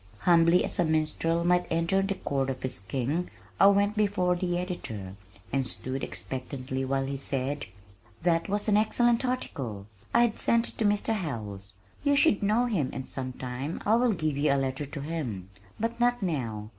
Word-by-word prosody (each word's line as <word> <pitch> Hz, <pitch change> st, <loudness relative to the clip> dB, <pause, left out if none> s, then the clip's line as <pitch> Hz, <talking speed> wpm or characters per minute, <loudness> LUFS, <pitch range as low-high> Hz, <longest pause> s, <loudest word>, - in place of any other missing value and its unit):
Humbly 170 Hz, 0 st, +5 dB
as -, -, -5 dB
a -, -, +5 dB
minstrel 160 Hz, +1 st, +1 dB
might 180 Hz, 0 st, +3 dB
enter 170 Hz, +4 st, +2 dB
the 195 Hz, 0 st, -1 dB
court 135 Hz, -6 st, -1 dB
of 130 Hz, -1 st, -4 dB
his 130 Hz, -7 st, -3 dB
king, 135 Hz, -, -2 dB, 0.3 s
I 195 Hz, -, +8 dB
went 200 Hz, +1 st, +4 dB
before 200 Hz, -4 st, +2 dB
the 175 Hz, -1 st, -1 dB
editor, 110 Hz, -, -5 dB, 0.4 s
and 135 Hz, -2 st, +1 dB
stood 130 Hz, +2 st, -3 dB
expectantly 130 Hz, 0 st, -4 dB
while 135 Hz, 0 st, 0 dB
he 135 Hz, 0 st, -3 dB
said: 140 Hz, +1 st, -2 dB, 0.6 s
"That 165 Hz, +1 st, +2 dB
was 205 Hz, +2 st, 0 dB
an 210 Hz, -1 st, +4 dB
excellent 235 Hz, +3 st, +3 dB
article. 135 Hz, -, -3 dB, 0.3 s
I 235 Hz, -, +5 dB
have 235 Hz, -2 st, 0 dB
sent 235 Hz, 0 st, +2 dB
it -, -, -11 dB
to 220 Hz, -, +2 dB
Mr. 205 Hz, +2 st, +2 dB
Howells. 105 Hz, -, -5 dB, 0.3 s
You 285 Hz, 0 st, +3 dB
should 275 Hz, -6 st, +4 dB
know 215 Hz, +4 st, +3 dB
him 180 Hz, -, 0 dB
and 130 Hz, -, -6 dB
sometime 130 Hz, +2 st, -4 dB
I 210 Hz, -, +4 dB
will 240 Hz, 0 st, +4 dB
give 155 Hz, -5 st, -1 dB
you 145 Hz, 0 st, +3 dB
a -, -, +4 dB
letter 135 Hz, +1 st, -2 dB
to 140 Hz, 0 st, -6 dB
him, 125 Hz, -, -4 dB, 0.3 s
but 230 Hz, +2 st, -2 dB
not 245 Hz, -2 st, +2 dB
now. 115 Hz, -, -2 dB
165 Hz, 180 wpm, -28 LUFS, 130-205 Hz, 0.6 s, I